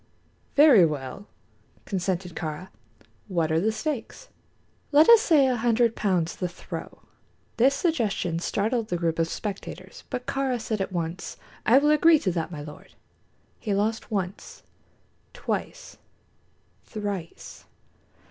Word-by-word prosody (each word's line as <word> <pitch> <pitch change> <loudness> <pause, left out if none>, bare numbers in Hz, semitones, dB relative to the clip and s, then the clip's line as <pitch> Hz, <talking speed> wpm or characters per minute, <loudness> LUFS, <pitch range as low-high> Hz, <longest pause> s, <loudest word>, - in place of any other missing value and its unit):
"Very 285 - +8
well," 150 +4 -3 0.6
consented 185 -2 -2
Kāra. 160 +4 -5 0.6
"What 170 -5 0
are 160 - +3
the 220 +3 +2
stakes?" 280 - -5 0.6
"Let 300 +2 +6
us 465 -2 +9
say 315 - +4
a 255 -1 +2
hundred 235 0 +2
pounds 180 -5 0
the 180 - -3
throw." 175 - -9 0.5
This 265 +4 +4
suggestion 215 - 0
startled 220 +5 -1
the 175 - -1
group 165 -1 -1
of 165 - +2
spectators; 200 +4 -7
but 250 0 -4
Kāra 270 -3 -1
said 220 -2 -3
at 195 - -3
once: 170 0 -4 0.3
"I 240 - +7
will 295 +2 +4
agree 315 +2 +6
to 195 -10 -1
that, 165 -2 -2
my 150 -3 -6
lord." 150 0 -12 0.6
He 205 -3 -1
lost 220 +3 -1
once, 195 -3 -4 0.7
twice, - - -5 0.8
thrice. 200 -6 -6
205 Hz, 130 wpm, -26 LUFS, 175-250 Hz, 0.8 s, us